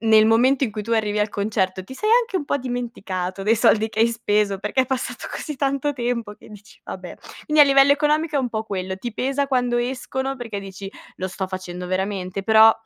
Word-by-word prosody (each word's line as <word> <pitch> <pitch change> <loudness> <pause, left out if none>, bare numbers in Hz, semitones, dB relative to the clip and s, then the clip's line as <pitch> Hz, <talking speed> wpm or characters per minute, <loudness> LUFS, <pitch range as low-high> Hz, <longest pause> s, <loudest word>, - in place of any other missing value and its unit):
n 225 - -2
nel 220 0 +7
momento 250 +5 +3
in 235 - -3
cui 210 0 -4
tu 230 +3 -4
arrivi 210 -2 +1
al 210 0 +1
concerto, 200 -3 -1
ti 260 - -10
sei 425 +10 -1
anche 465 -5 -3
un 310 - -2
po' 285 - 0
dimenticato 205 -7 -4
dei 220 +3 +3
soldi 220 0 +3
che 220 - -8
hai 225 - +6
speso, 210 -3 0
perché 260 +6 +1
è - - -6
passato 260 0 -3
così 300 -3 -5
tanto 275 +1 0
tempo 240 -5 -3
che 210 - -17
dici: 210 0 -15
"Vabbè". 180 -2 -8 0.3
Quindi, 300 0 +6
a - - +8
livello 275 0 +6
economico, 300 +1 +1
è - - +3
un 260 -2 0
po' 220 -1 -2
quello. 190 -3 -4
Ti 235 +4 -6
pesa 275 +3 0
quando 250 -3 +1
escono 265 +2 -3
perché 230 -5 -5
dici: 195 0 -8 0.3
"Lo 185 - -3
sto 190 +1 -4
facendo 180 -1 -6
veramente?" 190 0 -2
Però 220 +1 +7
225 Hz, 225 wpm, -22 LUFS, 200-265 Hz, 0.3 s, a